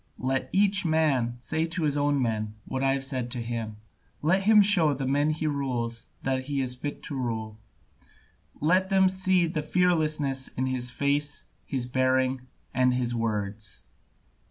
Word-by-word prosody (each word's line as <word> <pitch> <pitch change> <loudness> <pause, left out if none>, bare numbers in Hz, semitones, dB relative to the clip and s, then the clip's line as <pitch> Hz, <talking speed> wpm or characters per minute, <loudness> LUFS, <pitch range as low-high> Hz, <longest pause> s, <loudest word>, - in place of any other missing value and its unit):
Let 130 0 -1
each 195 0 +3
man 150 -8 +1
say 160 +7 -2
to 170 0 -3
his 145 -2 +1
own 145 0 +1
men 110 -3 -1
what 130 - -3
I 135 0 +3
have 135 0 -2
said 130 -3 -2
to 125 - -4
him, 115 -2 -4 0.5
let 180 +5 +3
him 210 +1 +6
show 175 -8 +4
the 135 0 -3
men 145 +3 +2
he 155 0 -2
rules 125 -6 -2 0.2
that 130 -1 -1
he 140 0 -2
is 130 -2 -1
fit 145 +3 -6
to 145 - -6
rule, 110 -4 -4 1.0
let 185 +5 +2
them 190 -1 +4
see 185 -1 +2
the 160 -2 -2
fearlessness 155 -5 +1
in 130 - -3
his 130 -1 -1
face, 145 +3 0 0.2
his 130 -3 -2
bearing, 130 0 +1 0.3
and 125 -1 +3
his 120 -1 0
words." 105 -3 -3
135 Hz, 165 wpm, -27 LUFS, 125-155 Hz, 1.0 s, him